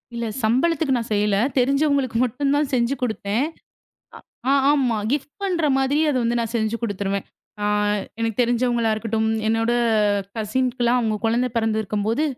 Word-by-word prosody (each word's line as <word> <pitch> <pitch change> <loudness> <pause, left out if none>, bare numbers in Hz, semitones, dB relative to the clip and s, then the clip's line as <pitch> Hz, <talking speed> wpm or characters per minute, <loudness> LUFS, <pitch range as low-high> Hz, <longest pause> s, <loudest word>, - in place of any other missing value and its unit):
இல்ல. 235 0 -3 0.2
சம்பளத்துக்கு 275 +5 +2
நான் 230 -2 -5
செய்யல. 205 -1 +2 0.2
தெரிஞ்சவங்களுக்கு 275 -1 +1
மட்டும் 275 +4 -1
தான் 290 -1 +1
செஞ்சு 240 +1 +2
கொடுத்தேன். 220 0 -1 1.1
ஆ-ஆமா 275 -3 +3 0.2
கிஃப்ட் 290 0 -2
பண்ற 355 -5 0
மாதிரி 270 +3 +1
அத 275 - -1
வந்து 235 +1 +1
நான் 230 -1 -3
செஞ்சு 220 0 0
கொடுத்துடுவேன். 200 -2 -2 0.4
அ - - 0 0.6
எனக்குத் 225 0 -1
தெரிஞ்சவங்களா 240 -1 +1
இருக்கட்டும். 220 0 -1 0.2
என்னோட 225 +1 +1 0.6
கசின்க்கெல்லாம் 240 +2 0
அவங்களுக்கு 220 -2 -1
குழந்தை 240 +3 +1
பிறந்து 225 -1 +1
இருக்கும்போது, 215 +7 -1
235 Hz, 135 wpm, -22 LUFS, 220-270 Hz, 1.1 s, ஆ-ஆமா